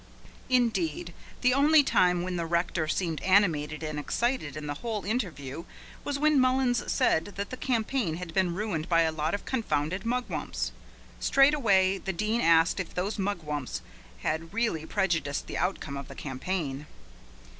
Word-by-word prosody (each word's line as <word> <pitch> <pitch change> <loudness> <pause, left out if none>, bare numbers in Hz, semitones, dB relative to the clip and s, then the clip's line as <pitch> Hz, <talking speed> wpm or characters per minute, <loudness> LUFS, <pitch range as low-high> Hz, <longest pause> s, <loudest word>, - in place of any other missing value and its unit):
Indeed, 185 - +1 0.3
the 250 0 +4
only 290 +3 +6
time 180 -8 +3
when 185 0 -3
the 170 -1 -2
rector 170 -1 0
seemed 165 -1 -1
animated 165 -6 +2
and 155 -1 -3
excited 195 - -1
in 150 - -6
the 145 - -2
whole 220 -4 -3
interview 170 - -3 0.4
was 285 -1 -2
when 300 0 +4
Mullins 255 -2 +2
said 165 +6 +1
that 200 0 -4
the - - -3
campaign 235 -7 -1
had 175 -1 -7
been 180 -2 +1
ruined 185 -5 -2
by 165 -1 +4
a 160 - +1
lot 155 +3 -1
of 205 - -7
confounded 185 - -1
mugwumps. 245 +2 -2 0.5
Straight 275 +2 +5
away 195 -8 +3
the 190 - -3
Dean 215 +6 0
asked 165 +2 +4
if 185 - -5
those 195 +4 -2
mugwumps 155 -9 -3 0.4
had 165 +1 -2
really 220 -9 0
prejudiced 170 -7 0
the - - -4
outcome 170 -6 -2
of 140 - -7
the - - -10
campaign. 145 0 -4
185 Hz, 160 wpm, -28 LUFS, 160-230 Hz, 0.5 s, only